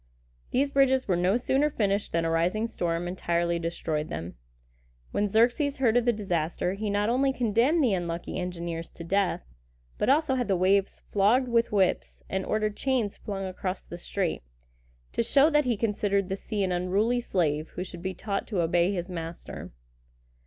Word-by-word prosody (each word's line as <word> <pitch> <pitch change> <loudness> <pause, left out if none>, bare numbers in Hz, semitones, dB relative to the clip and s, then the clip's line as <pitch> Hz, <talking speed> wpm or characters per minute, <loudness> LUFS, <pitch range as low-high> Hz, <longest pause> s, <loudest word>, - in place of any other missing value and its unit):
These 275 +2 +1
bridges 265 -1 +3
were 185 - +2
no 180 +5 +2
sooner 270 +4 +2
finished 205 -6 0
than 165 0 0
a - - +1
rising 175 +7 +1
storm 175 -6 -2
entirely 170 -1 0
destroyed 160 -2 -2
them. 85 +2 -5 0.8
When 205 0 0
Xerxes 245 +7 +2
heard 245 -4 +2
of 245 -1 +3
the 240 - +5
disaster, 180 -4 -1
he 210 +2 -3
not 205 +1 +1
only 265 +3 +2
condemned 250 +6 +2
the 235 -6 +3
unlucky 175 -1 -3
engineers 170 -2 -4
to 170 - -9
death, 195 - 0 0.6
but - - +1
also 290 0 +3
had 250 -2 0
the 195 - +2
waves 190 +2 +2
flogged 220 +6 +3
with 235 0 +2
whips, 195 -3 0
and 190 0 -1
ordered 215 -1 0
chains 250 -6 0
flung 195 -2 -5
across 185 0 -4
the 175 - -9
strait, 185 -1 -2 0.7
to - - +1
show 280 +6 +4
that 295 -1 +3
he 240 -3 +1
considered 200 -3 0
the 190 - -1
sea 205 0 -3
an 185 - 0
unruly 200 +7 +1
slave, 155 -8 0
who 180 - -2
should 175 -2 -9
be 190 +1 -3
taught 200 +2 -3
to 195 -6 0
obey 170 +3 +2
his 175 -2 -3
master. 170 -2 -7
200 Hz, 180 wpm, -27 LUFS, 175-235 Hz, 0.8 s, the